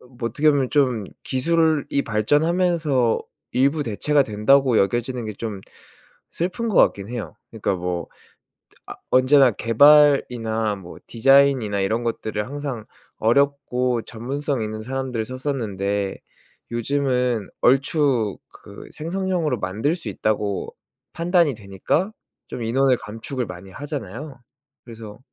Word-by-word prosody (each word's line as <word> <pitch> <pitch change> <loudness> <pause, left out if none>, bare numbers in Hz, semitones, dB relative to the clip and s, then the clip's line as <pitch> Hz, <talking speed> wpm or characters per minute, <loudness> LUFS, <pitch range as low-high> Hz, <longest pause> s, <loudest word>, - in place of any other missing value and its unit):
그니깐 125 0 -19
뭐 115 -2 -1
어떻게 150 +7 +3
보면 140 -3 0
좀 125 -7 +1 0.2
기술이 155 0 +1
발전하면서 150 - +1 0.3
일부 140 +4 +2
대체가 145 +5 +1
된다고 125 +3 +3
여겨지는 120 +5 0
게 110 - -5
좀 105 -2 -5 0.7
슬픈 185 +7 -2
거 215 - -2
같긴 100 0 +3
해요. 115 -9 -6
그러니까 95 - -2
뭐 90 -1 -4 0.8
아 - - -7 0.2
언제나 130 +1 +5
개발이나 115 -3 +4
뭐 90 -3 -11
디자인이나 130 -4 +3
이런 110 +5 0
것들을 110 -2 -3
항상 140 -4 -5 0.3
어렵고 125 -1 +1
전문성 135 +3 -3
있는 110 0 -5
사람들을 130 -1 -3
썼었는데 105 -7 -3 0.5
요즘은 125 -3 0
얼추 130 - +2 0.2
그 - - -12
생성형으로 170 -4 -2
만들 105 - -1
수 170 - -7
있다고 105 -2 -2 0.4
판단이 170 -4 +2
되니까 105 - -2 0.4
좀 120 - -6
인원을 130 +3 +2
감축을 115 +4 -5
많이 90 +1 -10
하잖아요? 140 - -7 0.5
그래서 110 -3 -10
125 Hz, 285 characters per minute, -22 LUFS, 110-145 Hz, 0.8 s, 언제나